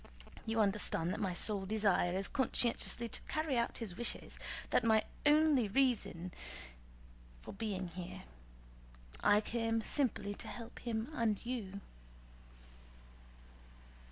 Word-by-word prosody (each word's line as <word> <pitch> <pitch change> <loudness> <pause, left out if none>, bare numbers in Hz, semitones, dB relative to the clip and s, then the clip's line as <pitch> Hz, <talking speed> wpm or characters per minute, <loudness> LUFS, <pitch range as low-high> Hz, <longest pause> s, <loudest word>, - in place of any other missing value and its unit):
You 225 0 +2
understand 195 -4 +2
that - - -4
my 190 -4 -1
sole 200 0 +1
desire 205 -4 +2
is 195 +1 0
conscientiously 240 -3 +2
to - - -3
carry 310 -3 0
out 235 0 0
his 210 -7 -3
wishes; 240 +4 -2 0.3
that - - +4
is - - -1
my 220 -1 +5 0.2
only 295 -5 +5
reason 205 -7 +1 1.1
for - - -8
being 195 -3 -3
here. 175 +1 -7 1.0
I 205 +1 +6
came 225 0 -1
simply 230 -8 0
to - - -7
help 235 0 -8
him 230 +1 -3
and 225 -7 +1
you." 205 -6 -4
220 Hz, 125 wpm, -35 LUFS, 195-240 Hz, 1.1 s, I